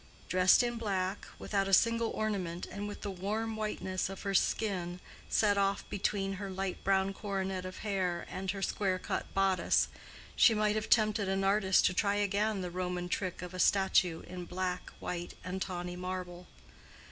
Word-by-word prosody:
Dressed 185 Hz, +5 st, +5 dB
in 240 Hz, -1 st, -2 dB
black, 195 Hz, -3 st, -2 dB
without 195 Hz, -2 st, -1 dB
a 195 Hz, -, -2 dB
single 230 Hz, +2 st, +2 dB
ornament, 185 Hz, -5 st, -2 dB
and 205 Hz, 0 st, -4 dB
with 205 Hz, -, -7 dB
the 205 Hz, -, -3 dB
warm 215 Hz, +4 st, -2 dB
whiteness 200 Hz, -4 st, -2 dB
of 195 Hz, -, -7 dB
her 195 Hz, -, -1 dB
skin 180 Hz, -3 st, 0 dB, 0.3 s
set 205 Hz, -2 st, +3 dB
off 195 Hz, 0 st, 0 dB
between 195 Hz, 0 st, 0 dB
her 200 Hz, -, -4 dB
light 190 Hz, 0 st, -3 dB
brown 195 Hz, 0 st, +2 dB
coronet 195 Hz, -2 st, -3 dB
of 185 Hz, -, -6 dB
hair 185 Hz, -4 st, -1 dB
and 190 Hz, +1 st, -5 dB
her 195 Hz, 0 st, -2 dB
square 190 Hz, -2 st, 0 dB
cut -, -, -4 dB
bodice, 195 Hz, -2 st, +3 dB, 0.5 s
she 225 Hz, -, +6 dB
might 210 Hz, 0 st, +2 dB
have 215 Hz, 0 st, -2 dB
tempted 215 Hz, -3 st, +3 dB
an 195 Hz, 0 st, 0 dB
artist 195 Hz, -1 st, +4 dB
to -, -, +3 dB
try 200 Hz, +2 st, +2 dB
again 205 Hz, 0 st, +1 dB
the 180 Hz, -1 st, -4 dB
Roman 180 Hz, 0 st, -3 dB
trick 185 Hz, -1 st, -2 dB
of 180 Hz, 0 st, -7 dB
a 185 Hz, -, -6 dB
statue 190 Hz, -3 st, +3 dB
in 180 Hz, 0 st, -7 dB
black, 180 Hz, 0 st, -3 dB
white, 175 Hz, -1 st, -4 dB
and 185 Hz, +1 st, -4 dB
tawny 180 Hz, -1 st, -3 dB
marble. 180 Hz, -1 st, -5 dB
195 Hz, 175 wpm, -32 LUFS, 185-205 Hz, 0.5 s, she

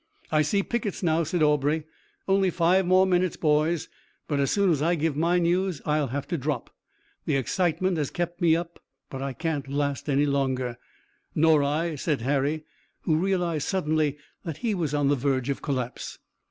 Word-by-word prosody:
"I 155 Hz, -1 st, +4 dB
see 200 Hz, +7 st, +1 dB
pickets 215 Hz, -4 st, -3 dB
now," 165 Hz, -1 st, +2 dB
said 165 Hz, +1 st, 0 dB
Aubrey. 150 Hz, +1 st, +2 dB, 0.4 s
"Only 195 Hz, -1 st, +3 dB
five 180 Hz, +2 st, +2 dB
more 185 Hz, +1 st, +5 dB
minutes, 180 Hz, -1 st, +1 dB
boys, 155 Hz, +1 st, +1 dB, 0.4 s
but 145 Hz, -2 st, 0 dB
as 140 Hz, -, +2 dB
soon 200 Hz, -3 st, +3 dB
as 150 Hz, -4 st, +1 dB
I 170 Hz, +3 st, +2 dB
give 160 Hz, -2 st, 0 dB
my 170 Hz, +4 st, +2 dB
news 175 Hz, -1 st, +1 dB
I'll 150 Hz, -1 st, +1 dB
have 140 Hz, +3 st, -4 dB
to 170 Hz, -3 st, -1 dB
drop. 135 Hz, -2 st, -3 dB, 0.5 s
The -, -, +1 dB
excitement 175 Hz, +5 st, 0 dB
has 150 Hz, -3 st, -1 dB
kept 175 Hz, +1 st, -4 dB
me 165 Hz, -2 st, +5 dB
up, 170 Hz, 0 st, -5 dB, 0.3 s
but 135 Hz, -, -5 dB
I 135 Hz, -1 st, -3 dB
can't 155 Hz, -3 st, -3 dB
last 140 Hz, 0 st, -2 dB
any 140 Hz, +1 st, +3 dB
longer." 130 Hz, -4 st, -1 dB, 0.6 s
"Nor 155 Hz, -1 st, +5 dB
I," 155 Hz, +4 st, 0 dB
said 150 Hz, -2 st, -1 dB
Harry, 145 Hz, +4 st, 0 dB, 0.4 s
who 160 Hz, -, +1 dB
realized 175 Hz, -4 st, 0 dB
suddenly 155 Hz, -5 st, 0 dB, 0.3 s
that 165 Hz, -4 st, -5 dB
he 220 Hz, -, +2 dB
was 160 Hz, -6 st, -1 dB
on 145 Hz, -1 st, +2 dB
the 145 Hz, -, +3 dB
verge 130 Hz, -1 st, 0 dB
of 140 Hz, -, -4 dB
collapse. 130 Hz, -5 st, -4 dB
155 Hz, 180 wpm, -26 LUFS, 140-175 Hz, 0.6 s, more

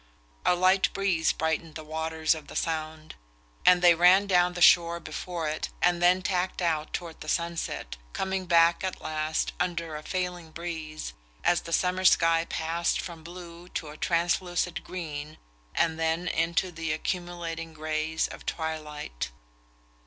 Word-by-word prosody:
A 180 Hz, -, +5 dB
light 185 Hz, +2 st, +4 dB
breeze 185 Hz, -5 st, +2 dB
brightened 160 Hz, 0 st, -2 dB
the 155 Hz, -, -6 dB
waters 160 Hz, +1 st, 0 dB
of 155 Hz, -2 st, -9 dB
the -, -, -10 dB
Sound, 155 Hz, -1 st, -3 dB, 0.5 s
and 180 Hz, -1 st, +7 dB
they 175 Hz, -1 st, +8 dB
ran 180 Hz, +4 st, +6 dB
down 180 Hz, -2 st, +3 dB
the -, -, -4 dB
shore 170 Hz, -1 st, +6 dB
before 165 Hz, +1 st, -4 dB
it 155 Hz, +1 st, -2 dB
and 175 Hz, 0 st, +2 dB
then 180 Hz, +1 st, +4 dB
tacked 185 Hz, 0 st, -1 dB
out 160 Hz, -4 st, 0 dB
toward 170 Hz, -2 st, -5 dB
the 155 Hz, -, -6 dB
sunset, 170 Hz, -, -2 dB
coming 190 Hz, -, -2 dB
back 170 Hz, 0 st, +5 dB
at 190 Hz, -1 st, -3 dB
last, 155 Hz, 0 st, -1 dB
under 170 Hz, -2 st, -2 dB
a 150 Hz, -, -5 dB
failing 180 Hz, -1 st, -3 dB
breeze, 160 Hz, -, -6 dB, 0.3 s
as 175 Hz, -, +3 dB
the 170 Hz, -, -9 dB
summer 180 Hz, +2 st, +1 dB
sky 165 Hz, -2 st, +5 dB
passed 165 Hz, +1 st, -1 dB
from 170 Hz, -3 st, -7 dB
blue 175 Hz, 0 st, -10 dB
to 155 Hz, -, -4 dB
a 150 Hz, -, -9 dB
translucid 175 Hz, +1 st, 0 dB
green 155 Hz, -4 st, -6 dB, 0.4 s
and 160 Hz, -1 st, +1 dB
then 165 Hz, +2 st, 0 dB
into 170 Hz, +2 st, +1 dB
the 165 Hz, -2 st, -3 dB
accumulating 170 Hz, 0 st, -3 dB
greys 155 Hz, 0 st, -1 dB
of -, -, -10 dB
twilight. 150 Hz, -, -4 dB
170 Hz, 150 wpm, -28 LUFS, 160-180 Hz, 0.5 s, they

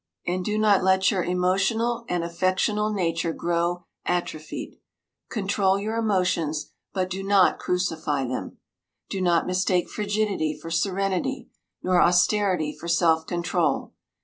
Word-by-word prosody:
And 180 Hz, +1 st, -1 dB
do 210 Hz, +3 st, -1 dB
not 210 Hz, -3 st, +4 dB
let 190 Hz, +2 st, +4 dB
your 190 Hz, -4 st, 0 dB
emotional 195 Hz, +7 st, 0 dB
and 175 Hz, -1 st, 0 dB
affectional 185 Hz, +5 st, 0 dB
nature 165 Hz, -4 st, -1 dB
grow 175 Hz, +1 st, -1 dB, 0.2 s
atrophied. 155 Hz, -3 st, -4 dB, 0.5 s
Control 195 Hz, -2 st, +1 dB
your 215 Hz, +3 st, -3 dB
emotions, 180 Hz, -8 st, 0 dB, 0.2 s
but 185 Hz, -2 st, -1 dB
do 185 Hz, +1 st, -4 dB
not 195 Hz, -1 st, +3 dB
crucify 160 Hz, -6 st, -1 dB
them. 125 Hz, 0 st, -5 dB, 0.5 s
Do 195 Hz, -, -2 dB
not 175 Hz, -2 st, +3 dB
mistake 185 Hz, -1 st, +1 dB
frigidity 205 Hz, -6 st, -1 dB
for 165 Hz, -, -8 dB
serenity, 195 Hz, +8 st, -1 dB, 0.3 s
nor 180 Hz, -1 st, +3 dB
austerity 180 Hz, -3 st, +2 dB
for 170 Hz, -, -9 dB
self 165 Hz, -1 st, +2 dB
control. 175 Hz, -1 st, -1 dB
185 Hz, 125 wpm, -25 LUFS, 170-200 Hz, 0.5 s, not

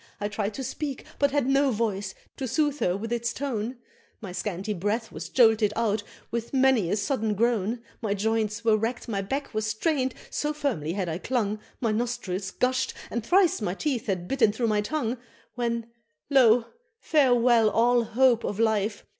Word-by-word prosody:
I 205 Hz, 0 st, -2 dB
tried 210 Hz, 0 st, -3 dB
to 270 Hz, -, -4 dB
speak, 280 Hz, +1 st, -4 dB
but 285 Hz, -, +4 dB
had 280 Hz, -2 st, +1 dB
no 275 Hz, +1 st, +3 dB
voice, 205 Hz, -4 st, -2 dB, 0.2 s
to 265 Hz, -, -3 dB
soothe 295 Hz, +3 st, 0 dB
her 180 Hz, +1 st, +1 dB
with 225 Hz, +3 st, -4 dB
its 235 Hz, 0 st, -1 dB
tone 250 Hz, -3 st, -3 dB, 0.4 s
My 200 Hz, -5 st, -7 dB
scanty 190 Hz, +2 st, -3 dB
breath 210 Hz, +5 st, -2 dB
was 160 Hz, +1 st, -7 dB
jolted 220 Hz, -4 st, +4 dB
out 220 Hz, -2 st, +1 dB, 0.3 s
with 235 Hz, +3 st, -3 dB
many 260 Hz, -8 st, +4 dB
a 200 Hz, -, +2 dB
sudden 215 Hz, 0 st, -1 dB
groan 230 Hz, +1 st, 0 dB, 0.2 s
My 210 Hz, -3 st, 0 dB
joints 220 Hz, +1 st, -1 dB
were 220 Hz, -1 st, +5 dB
racked 225 Hz, +4 st, -2 dB
my 200 Hz, -4 st, -1 dB
back 270 Hz, +8 st, -4 dB
was 215 Hz, 0 st, -1 dB
strained, 260 Hz, +3 st, 0 dB, 0.2 s
so 300 Hz, 0 st, -1 dB
firmly 240 Hz, -, -2 dB
I 195 Hz, -2 st, -1 dB
had 170 Hz, +1 st, -4 dB
clung 215 Hz, -4 st, 0 dB, 0.2 s
My 230 Hz, -3 st, +1 dB
nostrils 215 Hz, -5 st, -2 dB
gush'd, 255 Hz, +4 st, 0 dB, 0.2 s
and 235 Hz, -, -2 dB
thrice 355 Hz, -, +3 dB
my 180 Hz, -3 st, -1 dB
teeth 265 Hz, -2 st, -2 dB
had 180 Hz, -3 st, -2 dB
bitten 235 Hz, -4 st, +3 dB
through 230 Hz, +2 st, -1 dB
my 210 Hz, -1 st, +2 dB
tongue 245 Hz, 0 st, -2 dB, 0.3 s
When 235 Hz, -2 st, -2 dB, 0.5 s
lo! 245 Hz, -4 st, +6 dB, 0.3 s
farewell 245 Hz, -, +4 dB
all 240 Hz, +2 st, +3 dB
hope 240 Hz, 0 st, +3 dB
of 205 Hz, -, -3 dB
life! 215 Hz, -2 st, +1 dB
230 Hz, 180 wpm, -26 LUFS, 210-255 Hz, 0.5 s, lo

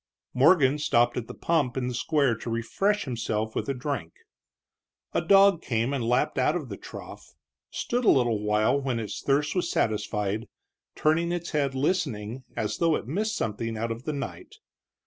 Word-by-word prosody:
Morgan 145 Hz, +1 st, +5 dB
stopped 120 Hz, -4 st, +2 dB
at 120 Hz, -2 st, -3 dB
the -, -, -7 dB
pump 145 Hz, -7 st, 0 dB
in 125 Hz, -1 st, -1 dB
the 125 Hz, -, -3 dB
square 140 Hz, 0 st, +2 dB
to 115 Hz, -, -7 dB
refresh 195 Hz, -, 0 dB
himself 110 Hz, -3 st, -2 dB
with -, -, -2 dB
a -, -, +1 dB
drink. 140 Hz, +3 st, -4 dB, 1.0 s
A -, -, +2 dB
dog 195 Hz, -3 st, +5 dB
came 115 Hz, +2 st, -1 dB
and 135 Hz, -4 st, -1 dB
lapped 120 Hz, +3 st, +1 dB
out 150 Hz, +5 st, +2 dB
of 150 Hz, -8 st, -4 dB
the 100 Hz, -, -5 dB
trough, -, -, -11 dB, 0.3 s
stood 245 Hz, +1 st, -2 dB
a -, -, +5 dB
little 120 Hz, -5 st, +3 dB
while 105 Hz, +6 st, +2 dB
when 130 Hz, -4 st, -1 dB
its 110 Hz, -2 st, -5 dB
thirst 145 Hz, +2 st, +1 dB
was 180 Hz, -2 st, -1 dB
satisfied, 105 Hz, 0 st, -1 dB, 0.5 s
turning 165 Hz, +3 st, +2 dB
its 175 Hz, -1 st, -3 dB
head 140 Hz, -3 st, 0 dB
listening, 130 Hz, -, -1 dB
as 105 Hz, -, -2 dB
though 165 Hz, -2 st, +3 dB
it -, -, -4 dB
missed 210 Hz, -, -1 dB
something 115 Hz, -, -3 dB
out 115 Hz, +1 st, -2 dB
of 115 Hz, +3 st, -6 dB
the 155 Hz, -, -2 dB
night. 140 Hz, -, -6 dB
130 Hz, 180 wpm, -27 LUFS, 115-155 Hz, 1.0 s, Morgan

